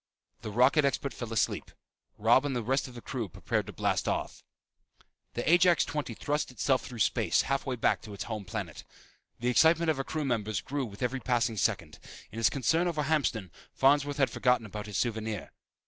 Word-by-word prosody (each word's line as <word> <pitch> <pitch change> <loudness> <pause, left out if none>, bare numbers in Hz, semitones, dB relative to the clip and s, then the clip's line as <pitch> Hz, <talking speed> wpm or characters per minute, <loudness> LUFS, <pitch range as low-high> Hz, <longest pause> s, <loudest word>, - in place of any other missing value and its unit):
The 115 - -5
rocket 125 +8 +4
expert 140 0 0
fell 120 -2 -6
asleep. 115 - 0 0.5
Robb 115 +5 +4
and 140 -2 -2
the 120 - -1
rest 135 +5 0
of 125 - -12
the 120 - -9
crew 120 -7 -4
prepared - - -2
to - - -6
blast - - -1
off. - - -2 0.9
The 120 - -3
Ajax 175 +1 +5
XX 145 -7 -4
thrust 150 +1 -1
itself 130 0 +1
through 125 - -8
space, 110 - +2
halfway 135 -1 -1
back 115 - +1
to 105 - -10
its - - -4
home 110 -3 -5
planet. 90 - -6 0.6
The 120 - +1
excitement 160 +5 +4
of 150 - -3
her 135 - -1
crew 155 +1 -3
members 110 -6 -1
grew 135 +9 -3
with 100 +2 -8
every 130 +2 -1
passing 120 -3 0
second. 95 -7 -1 0.3
In 110 - -9
his 115 - +4
concern 160 +6 +1
over 155 -3 -1
Hamston, 135 - 0 0.2
Farnsworth 145 +1 +3
had 135 -2 +2
forgotten 125 -2 +2
about 105 0 -7
his 105 - -4
souvenir. 110 -3 -2
125 Hz, 195 wpm, -29 LUFS, 110-145 Hz, 0.9 s, Ajax